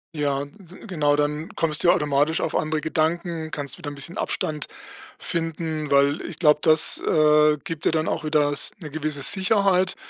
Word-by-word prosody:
Ja, 140 -2 -1
d 185 +3 -16
genau, 150 -6 +1
dann 150 +2 -2
kommst 155 -2 0
du 175 - +4
ja - - +7
automatisch 150 -1 +1
auf - - -3
andere 155 0 0
Gedanken, 160 +1 -2
kannst 140 -3 -5
wieder 145 - -6
'n - - -9
bisschen 145 +6 -5
Abstand 150 -2 -2 0.5
finden, 160 -2 -3
weil 140 +3 +3
ich 170 -3 -8
glaube, 150 -3 +4
das, 155 0 +4
äh, 150 0 +4
gibt 165 -4 -6
dir - - +3
dann 160 0 -1
auch 160 - -2
wieder 150 -1 +1
s 145 - +2
'ne 155 - -7
gewisse 150 -1 -4
Sicherheit 190 +2 +2
155 Hz, 185 wpm, -23 LUFS, 150-165 Hz, 0.5 s, ja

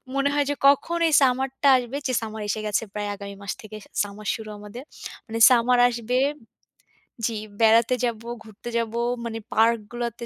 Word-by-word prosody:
মনে 275 +1 +2
হয় 290 -1 +1
যে 290 - 0
কখন 310 +5 +3
এই 320 - 0
summer-টা 265 +1 +2
আসবে। 250 +2 -4
যে 255 - -1
summer 220 -1 -6
এসে 215 - -1
গেছে 210 - +1
প্রায় 205 -1 -3
আগামী 200 0 -9
মাস 200 - -3
থেকে 215 0 -10 0.3
summer 205 +1 -9
শুরু 220 -1 -8
আমাদের। 210 +5 -9 0.4
মানে 225 0 -4
summer 250 0 +4
আসবে 240 +1 -2 1.1
জি, 225 -2 -4 0.2
বেড়াতে 230 +2 +5
যাব, 235 -2 -1 0.3
ঘুরতে 220 +2 -10
যাব, 230 -1 -2 0.3
মানে 225 -1 -4
পার্কগুলাতে 235 +1 0
230 Hz, 165 wpm, -24 LUFS, 215-250 Hz, 1.1 s, বেড়াতে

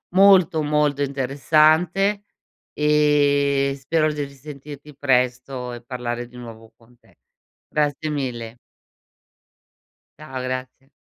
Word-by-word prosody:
molto, 185 -5 +5
molto 150 -1 +1
interessante 155 +9 +2 0.5
e 145 -2 +2
spero 155 +3 +1
di 150 -1 -3
risentirti 145 +1 -11
presto 125 -1 -1
e 120 - -8
parlare 120 0 -4
di 125 - -19
nuovo 115 -2 -11
con 120 +1 -24
te. - - -27 0.5
Grazie 150 0 -1
mille. 120 -5 -4 1.6
Ciao, 130 -4 -7
grazie. 130 +1 -6
140 Hz, 100 wpm, -22 LUFS, 125-150 Hz, 1.6 s, molto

